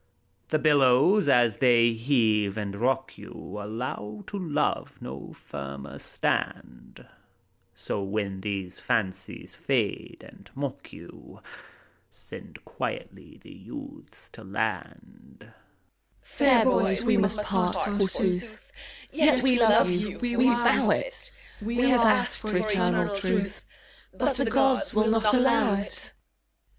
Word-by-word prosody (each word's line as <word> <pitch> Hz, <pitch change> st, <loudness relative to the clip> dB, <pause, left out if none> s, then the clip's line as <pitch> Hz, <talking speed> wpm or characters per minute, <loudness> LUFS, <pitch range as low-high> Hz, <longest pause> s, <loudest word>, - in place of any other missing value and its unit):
The 155 Hz, -, +1 dB
billows, 150 Hz, +6 st, +4 dB
as 120 Hz, -5 st, +3 dB
they 120 Hz, -3 st, +4 dB
heave 110 Hz, -4 st, +1 dB
and 100 Hz, -2 st, -4 dB
rock 130 Hz, +4 st, -1 dB
you, 105 Hz, -, -9 dB
Allow 105 Hz, -1 st, -6 dB
to 200 Hz, -, -6 dB
love 150 Hz, -5 st, -2 dB
no 65 Hz, +2 st, -8 dB
firmer 70 Hz, 0 st, -9 dB
stand, -, -, -4 dB, 0.7 s
So, 100 Hz, -, -4 dB
when 100 Hz, -1 st, -3 dB
these 95 Hz, -2 st, -5 dB
fancies 95 Hz, -3 st, -3 dB
fade -, -, -3 dB
and -, -, -17 dB
mock 140 Hz, -1 st, -6 dB
you. -, -, -14 dB, 0.7 s
Send -, -, -11 dB
quietly -, -, -7 dB
the -, -, -13 dB
youths 285 Hz, +1 st, -12 dB
to -, -, -14 dB
land. -, -, -5 dB
DORIDES. -, -, -18 dB, 0.7 s
Fair 260 Hz, -5 st, +3 dB
bo3rs, 195 Hz, -6 st, +2 dB
we 225 Hz, -2 st, +3 dB
must 205 Hz, +1 st, +1 dB
part, 185 Hz, -3 st, 0 dB
forsooth; 205 Hz, +1 st, -1 dB, 0.4 s
Yet 300 Hz, -4 st, +3 dB
we 255 Hz, -2 st, +4 dB
love 220 Hz, -4 st, +5 dB
you, 185 Hz, +3 st, -2 dB
we 245 Hz, -1 st, -2 dB
vow 240 Hz, -1 st, +3 dB
it! -, -, -2 dB, 0.3 s
We 225 Hz, +3 st, -4 dB, 0.2 s
have 245 Hz, -2 st, +4 dB
asked 245 Hz, +2 st, +3 dB
for 215 Hz, -4 st, -2 dB
eternal 195 Hz, 0 st, +1 dB
truth. 195 Hz, +1 st, -2 dB, 0.5 s
But 285 Hz, -, 0 dB
the 275 Hz, -, +1 dB
Gods 265 Hz, -2 st, +2 dB
will 215 Hz, +1 st, +3 dB
not 220 Hz, -1 st, +3 dB
allow 235 Hz, -4 st, +3 dB
it. 200 Hz, +1 st, -5 dB
190 Hz, 125 wpm, -26 LUFS, -, 0.7 s, love